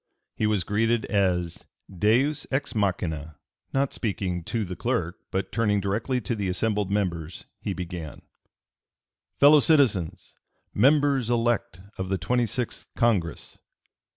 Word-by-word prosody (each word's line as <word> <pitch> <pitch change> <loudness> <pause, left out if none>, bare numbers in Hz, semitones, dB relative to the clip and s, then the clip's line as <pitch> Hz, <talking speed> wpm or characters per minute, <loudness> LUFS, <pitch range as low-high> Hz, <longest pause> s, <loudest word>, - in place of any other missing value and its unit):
He 110 - 0
was 105 -4 +1
(p. - - -19
293) 110 +2 +2 0.2
greeted - - -1
as 90 -4 +1 0.3
a - - -15
Deus 125 - +2
ex 135 -2 -1
machina. 80 - -1 0.4
Not 135 0 0
speaking 95 -6 -2
to 115 -3 -2
the 90 0 -6
clerk, 90 -5 -2
but 95 0 -2
turning 105 -1 +1
directly 105 +6 -1
to 120 - -2
the 100 -3 -2
assembled 105 +1 0
members, 90 -5 -2
he 100 - -3
began: 90 -4 -7 1.2
"Fellow 145 +2 +8
citizens! 135 - +2 0.4
Members 140 0 +3
elect 120 -5 0 0.2
of 95 0 -3
the 95 - +1
twenty 120 +7 +1
sixth 125 +1 -3
Congress!" 95 -9 0
105 Hz, 140 wpm, -26 LUFS, 90-120 Hz, 1.2 s, Fellow